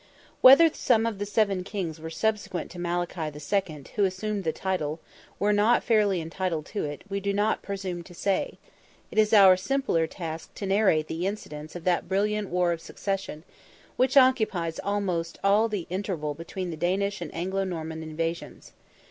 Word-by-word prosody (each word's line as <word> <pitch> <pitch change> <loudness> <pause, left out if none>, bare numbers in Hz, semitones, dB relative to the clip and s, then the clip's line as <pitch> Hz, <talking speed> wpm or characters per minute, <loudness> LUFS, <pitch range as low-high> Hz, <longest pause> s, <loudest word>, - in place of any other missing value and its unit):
Whether 275 +6 +9
some 225 -3 +2
of 225 -4 -2
the 205 - -3
seven 200 -3 +1
kings 175 -5 -5
subsequent 210 -5 -1
to 180 - -9
Malachy 175 0 -2
II., 150 0 -2
who 205 - +2
assumed 200 +2 -1
the 160 - 0
title, 165 -4 -2 0.4
were 205 +1 +2
not 215 +4 +3
fairly 210 -5 +3
entitled 165 -1 -3
to 210 - -1
it, 145 0 -6
we 200 0 -2
do 200 0 -1
not 205 +2 +1
presume 190 -3 -4
to 175 - -13
say; 195 +2 -1 0.5
it - - 0
is 215 -1 +4
our 195 -4 +8
simpler 185 -6 0
task 165 -2 -7
to 200 - -5
narrate 195 -6 +3
the 170 +3 -2
incidents 155 -7 -6
of 175 - -7
that 175 0 0
brilliant 210 +1 0
war 180 0 +1
of 165 -1 -3
succession, 195 -6 -4 0.5
which 265 +2 +2
occupies 220 -11 +3
almost 185 -5 -2
all 205 +3 +4
the 200 -6 -3
interval 180 -6 -2
between 175 +3 -6
the 160 - -6
Danish 195 +4 0
and 170 - -5
Anglo 190 +3 -1
Norman 160 -3 -5
invasions. 165 +1 -5
190 Hz, 170 wpm, -27 LUFS, 165-205 Hz, 0.5 s, Whether